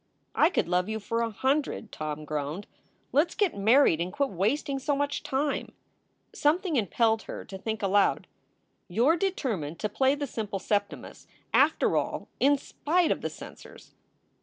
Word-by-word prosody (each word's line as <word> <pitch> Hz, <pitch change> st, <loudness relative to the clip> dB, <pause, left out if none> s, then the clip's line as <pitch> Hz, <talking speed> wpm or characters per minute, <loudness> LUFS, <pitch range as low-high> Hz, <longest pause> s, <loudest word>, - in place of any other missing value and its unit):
"I 310 Hz, -, +4 dB
could 355 Hz, -, 0 dB
love 180 Hz, +2 st, +1 dB
you 220 Hz, 0 st, -2 dB
for 230 Hz, +3 st, -2 dB
a 230 Hz, -, 0 dB
hundred," 265 Hz, 0 st, -1 dB
Tom 155 Hz, 0 st, -5 dB
groaned. 150 Hz, +6 st, -4 dB, 0.5 s
"Let 295 Hz, +7 st, +4 dB
s -, -, -12 dB
get 405 Hz, -5 st, +1 dB
married 200 Hz, -, +4 dB
and 180 Hz, +2 st, -2 dB
quit 280 Hz, +4 st, -1 dB
wasting 260 Hz, -, 0 dB
so 285 Hz, +2 st, 0 dB
much 285 Hz, +1 st, -1 dB
time." 280 Hz, +2 st, -2 dB, 0.6 s
Something 330 Hz, +3 st, +1 dB
impelled 225 Hz, -, +2 dB
her -, -, -6 dB
to 195 Hz, -, -9 dB
think 220 Hz, +1 st, -4 dB
aloud: 200 Hz, +1 st, +2 dB, 0.6 s
"You 225 Hz, +8 st, +1 dB
re 325 Hz, +2 st, +4 dB
determined 230 Hz, -, -2 dB
to 210 Hz, -, -2 dB
play 265 Hz, +6 st, +2 dB
the 290 Hz, 0 st, -3 dB
simple 215 Hz, -6 st, -4 dB
Septimus, 205 Hz, +2 st, -3 dB, 0.3 s
after -, -, +3 dB
all, -, -, -2 dB
in 285 Hz, +1 st, +4 dB
spite 325 Hz, +5 st, 0 dB
of -, -, -1 dB
the -, -, -2 dB
censors." -, -, -12 dB
230 Hz, 165 wpm, -28 LUFS, 195-285 Hz, 0.6 s, I